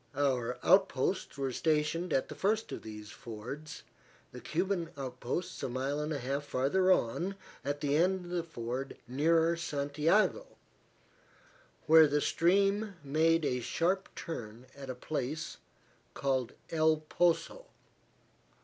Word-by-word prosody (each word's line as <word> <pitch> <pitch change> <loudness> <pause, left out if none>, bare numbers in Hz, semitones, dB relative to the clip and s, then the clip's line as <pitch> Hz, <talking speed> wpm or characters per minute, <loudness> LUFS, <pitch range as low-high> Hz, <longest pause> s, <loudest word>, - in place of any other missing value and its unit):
Our 125 -3 0
outposts 185 -6 +2
were 135 -1 -1
stationed 160 +5 0
at 135 - +1
the - - -7
first 215 +3 0
of - - -5
these 105 -1 -9
fords, 125 +7 -8 0.5
the - - -9
Cuban 175 0 -1
outposts 130 +5 -4
a - - -2
mile 135 +4 -2
and 150 +1 -2
a 150 - -1
half 140 +2 -2
farther 145 +8 +2
on 180 +7 +1 0.3
at 145 +1 -2
the 175 +4 +1
ford 125 +1 -4
nearer 165 +6 +3
Santiago, 160 - +1 1.4
where 160 0 +8
the 145 +1 +1
stream 200 +6 +2
made 160 +3 +2
a 125 -2 0
sharp 180 +9 0
turn 120 -8 -7
at 135 -1 -9
a 130 - -3
place 150 +3 -4 0.6
called 130 -3 0 0.2
El 160 -1 +3
Poso. 175 - +1
150 Hz, 120 wpm, -32 LUFS, 130-175 Hz, 1.4 s, where